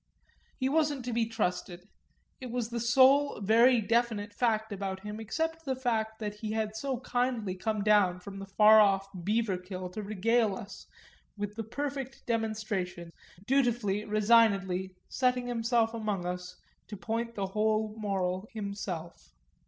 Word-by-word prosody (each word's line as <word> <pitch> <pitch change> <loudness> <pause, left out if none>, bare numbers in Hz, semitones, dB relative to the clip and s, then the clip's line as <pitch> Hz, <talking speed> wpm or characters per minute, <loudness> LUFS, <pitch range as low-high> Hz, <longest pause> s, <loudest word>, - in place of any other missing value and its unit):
He 260 - 0
wasn't 290 -3 +1
to 245 - -3
be 230 -1 +1
trusted 180 -4 -3 0.5
it 255 - -7
was 235 -1 -2
the 235 - -2
sole 265 +4 +4
very 230 +5 +5
definite 220 -2 0
fact 220 -1 0
about 190 -1 -4
him 210 +1 -6
except 325 +9 -3
the 270 -3 -1
fact 220 -4 -1
that 210 -2 -4
he 215 +1 -5
had 220 -1 -2
so 260 +1 -3
kindly 245 -6 -1
come 205 +3 -2
down 200 -4 +4
from 195 +2 -9
the 195 - -7
far 215 +2 +7
off 195 -2 +4
Beaverkill 185 -2 -2
to 215 - -5
regale 215 +1 +1
us 215 -3 -10 0.5
with 205 0 -4
the 225 - -4
perfect 270 +3 -5
demonstration, 215 -7 -2 0.3
dutifully, 240 -6 +1
resignedly 200 -4 +3
setting 250 -1 +1
himself 230 -1 +1
among 210 -5 -2
us 180 0 -5 0.3
to 210 - -7
point 230 +3 -3
the 200 - -1
whole 215 +2 0
moral 190 -1 -2
himself. 200 -5 -6
215 Hz, 145 wpm, -30 LUFS, 195-235 Hz, 0.5 s, far